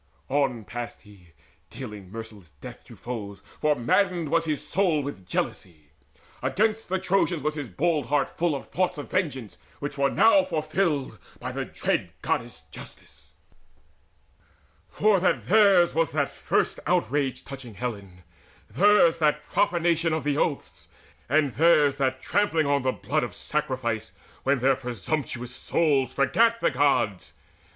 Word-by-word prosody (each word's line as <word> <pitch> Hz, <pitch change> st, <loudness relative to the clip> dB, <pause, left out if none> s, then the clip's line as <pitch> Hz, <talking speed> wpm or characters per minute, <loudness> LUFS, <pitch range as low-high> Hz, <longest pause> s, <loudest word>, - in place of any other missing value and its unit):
On 130 Hz, -4 st, 0 dB
passed 120 Hz, +3 st, -7 dB
he, 95 Hz, -6 st, -18 dB, 0.4 s
dealing 105 Hz, -7 st, -9 dB
merciless 110 Hz, -5 st, -9 dB
death -, -, -10 dB
to -, -, -13 dB
foes, 100 Hz, -5 st, -7 dB, 0.2 s
For 150 Hz, -1 st, +2 dB
maddened 170 Hz, +6 st, +1 dB
was 165 Hz, +2 st, +2 dB
his 155 Hz, -2 st, -2 dB
soul 175 Hz, -6 st, +1 dB
with 115 Hz, -10 st, -7 dB
jealousy. 80 Hz, -4 st, -4 dB, 0.5 s
Against 220 Hz, +1 st, 0 dB
the 190 Hz, -, +1 dB
Trojans 185 Hz, -4 st, 0 dB
was 150 Hz, 0 st, 0 dB
his 145 Hz, -5 st, -6 dB
bold 150 Hz, -, 0 dB
heart 145 Hz, 0 st, 0 dB
full 170 Hz, -3 st, +1 dB
Of 135 Hz, -, -7 dB
thoughts 180 Hz, -1 st, -1 dB
of 145 Hz, -, -8 dB
vengeance, 135 Hz, -, -2 dB, 0.2 s
which 145 Hz, 0 st, -6 dB
were 140 Hz, 0 st, +3 dB
now 225 Hz, -, +5 dB
fulfilled 155 Hz, -, -1 dB, 0.2 s
By -, -, -5 dB
the -, -, -3 dB
dread -, -, -2 dB
Goddess -, -, -2 dB
Justice, -, -, -13 dB, 1.6 s
for 205 Hz, -, +3 dB
that 185 Hz, -, +1 dB
theirs 200 Hz, -4 st, +5 dB
Was 165 Hz, -1 st, 0 dB
that -, -, 0 dB
first -, -, -1 dB
outrage 135 Hz, +3 st, 0 dB
touching 130 Hz, -6 st, -9 dB
Helen, 100 Hz, -5 st, -6 dB, 0.5 s
theirs 185 Hz, -4 st, +4 dB
That 150 Hz, -1 st, +2 dB
profanation 170 Hz, +1 st, +1 dB
of 160 Hz, -3 st, -1 dB
the 145 Hz, 0 st, 0 dB
oaths, 145 Hz, -1 st, -2 dB, 0.4 s
and 145 Hz, 0 st, +3 dB
theirs 150 Hz, -2 st, +4 dB
That 130 Hz, -1 st, 0 dB
trampling 165 Hz, -5 st, +1 dB
on 140 Hz, 0 st, +2 dB
the 130 Hz, 0 st, +1 dB
blood 155 Hz, +4 st, -1 dB
of -, -, -5 dB
sacrifice 130 Hz, -7 st, -2 dB, 0.3 s
When 140 Hz, +1 st, +2 dB
their 130 Hz, +2 st, +3 dB
presumptuous 125 Hz, +1 st, -4 dB
souls 135 Hz, -6 st, +1 dB
forgat 230 Hz, +11 st, +3 dB
the -, -, +2 dB
Gods. 125 Hz, -8 st, +1 dB
145 Hz, 145 wpm, -26 LUFS, 125-170 Hz, 1.6 s, now